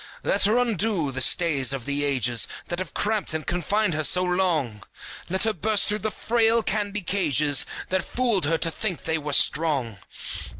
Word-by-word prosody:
Let - - +2
her 215 +4 +2
undo 215 - 0
the 130 0 -4
stays 140 -5 +2
of 130 -4 -5
the 145 0 -2
ages, 125 -5 +1 0.2
That 175 - -3
have 185 -7 -6
cramped 210 -6 -1
and 155 - -4
confined 180 +3 -1
her 155 0 -1
so 180 +4 +4
long! 170 - -1 0.5
Let 190 +2 0
her 220 -1 +2
burst 210 +3 +1
through 210 +1 -1
the 215 - -2
frail 230 +1 +1
candy 210 -1 -2
cages 150 -7 +2 0.2
That 185 -1 0
fooled 235 -8 0
her 165 +3 +1
to 165 +1 -2
think 190 -1 -4
they 160 0 -1
were 150 -1 -5
strong! 140 -9 +2
175 Hz, 180 wpm, -24 LUFS, 145-210 Hz, 0.5 s, so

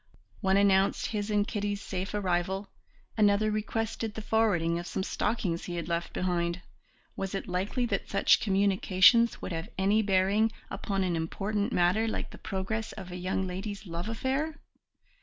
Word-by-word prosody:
One 190 0 +3
announced 195 -1 +3
his 210 -1 -2
and 205 -1 +2
Kitty's 205 -1 -2
safe 195 0 -4
arrival, 190 0 -1 0.5
another 210 0 +4
requested 220 +1 -2
the 220 - -5
forwarding 180 -7 +2
of 175 - -6
some 190 - -2
stockings 190 -5 -1
he 175 - -4
had 170 -2 -4
left 170 0 -2
behind; 175 -1 -1 0.5
was 195 0 -3
it 195 - -4
likely 190 +7 -1
that 240 - -2
such - - +4
communications 200 +3 +4
would - - -4
have 165 +4 -4
any 200 +3 +3
bearing 200 +2 +2 0.2
upon 195 -2 -1
an 180 -2 0
important 200 +7 -2
matter 185 +5 +2
like 220 - -3
the - - -12
progress 220 +4 -3
of 185 -3 -8
a - - -5
young 185 +1 -1
lady's 195 +3 -5
love 170 +3 -4
affair? 270 +6 -1
195 Hz, 160 wpm, -29 LUFS, 180-215 Hz, 0.5 s, another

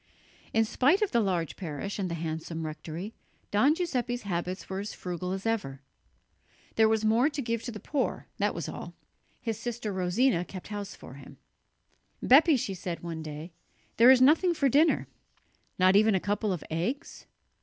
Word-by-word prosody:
In 225 0 +3
spite 290 - +3
of 415 - -1
the 235 - +3
large 180 -7 -1
parish 185 +4 -5
and 190 -2 -1
the 170 - -3
handsome 160 0 -4
rectory, 165 +6 -6 0.4
Don 265 +9 +4
Giuseppe's 250 -8 -2
habits 180 -1 -3
were 190 0 -4
as 205 +1 -5
frugal 180 0 -4
as 190 +2 -4
ever. 165 -12 -2 0.9
There 220 -1 +5
was 220 0 +1
more 230 +6 +4
to 290 -1 -6
give 230 -3 -1
to 240 - -5
the 215 - -8
poor, 275 +5 -2
that - - +1
was - - -4
all. - - -7 0.5
His 225 -3 -3
sister 230 -3 -4
Rosina 185 +3 +2
kept 185 +1 -9
house 205 -1 -5
for - - -12
him. 135 0 -13 0.8
"Bepi," 290 +3 +6
she 205 -4 -3
said 180 -2 -5
one 165 -2 -5
day, 155 +2 -7 0.5
"there 235 +2 +8
is 260 -1 +7
nothing 330 +6 +4
for 280 -3 +2
dinner." 300 +6 +3 0.7
"Not 185 +1 +5
even 215 0 +5
a - - +2
couple 205 +2 -1
of 180 -4 -3
eggs?" 180 - -3
205 Hz, 175 wpm, -28 LUFS, 175-245 Hz, 0.9 s, there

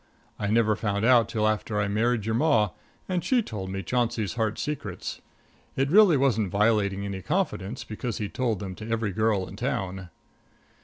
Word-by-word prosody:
I 100 - -1
never 110 0 +3
found 105 0 -1
out 120 -2 +5
till 110 -1 +1
after 105 0 -1
I 105 - +1
married 110 +2 +1
your 110 - 0
Ma, 115 - +3 0.4
and 180 -3 -1
she 245 +5 +2
told 95 - -6
me 95 0 -4
Chauncey's 115 -1 -1
heart 110 -2 -1
secrets. 130 -11 -4 0.5
It 135 +2 0
really 195 -5 +7
wasn't 115 -7 +2
violating 100 -1 +1
any 100 -1 -4
confidence, 105 - -2
because 110 +1 -4
he'd 105 -2 -4
told 120 -4 0
them 95 0 -6
to 110 +1 -8
every 115 -2 0
girl 105 -2 +1
in 100 - -10
town. 95 -8 -3
110 Hz, 175 wpm, -26 LUFS, 100-125 Hz, 0.5 s, really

